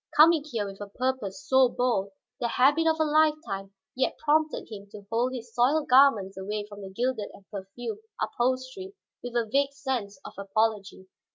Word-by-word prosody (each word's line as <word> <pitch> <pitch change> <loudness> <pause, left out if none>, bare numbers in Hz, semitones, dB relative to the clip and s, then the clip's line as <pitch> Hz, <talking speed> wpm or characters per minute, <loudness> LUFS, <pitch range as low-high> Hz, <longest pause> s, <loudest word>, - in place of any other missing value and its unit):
Coming 315 0 +7
here 235 -9 -3
with 195 0 -9
a 205 - -5
purpose 255 +1 -3
so 260 -2 +5
bold, 235 -6 0 0.3
the 240 - 0
habit 285 +7 +3
of 320 0 +2
a - - +4
lifetime 300 -11 +1 0.2
yet 260 - 0
prompted 310 +1 +1
him 200 -2 -9
to 205 -1 -12
hold 240 +3 +1
his 235 -2 -8
soiled 270 +6 +2
garments 230 -8 +5
away 205 +2 -3
from 205 -1 -11
the 195 - -7
gilded 235 +1 -2
and 195 - -19
perfumed 210 - -6 0.2
upholstery 260 +11 -2 0.3
with 245 -1 -7
a 235 -1 +2
vague 275 +4 +1
sense 260 -6 -4
of - - -8
apology. 200 -1 -1
245 Hz, 175 wpm, -27 LUFS, 205-280 Hz, 0.3 s, Coming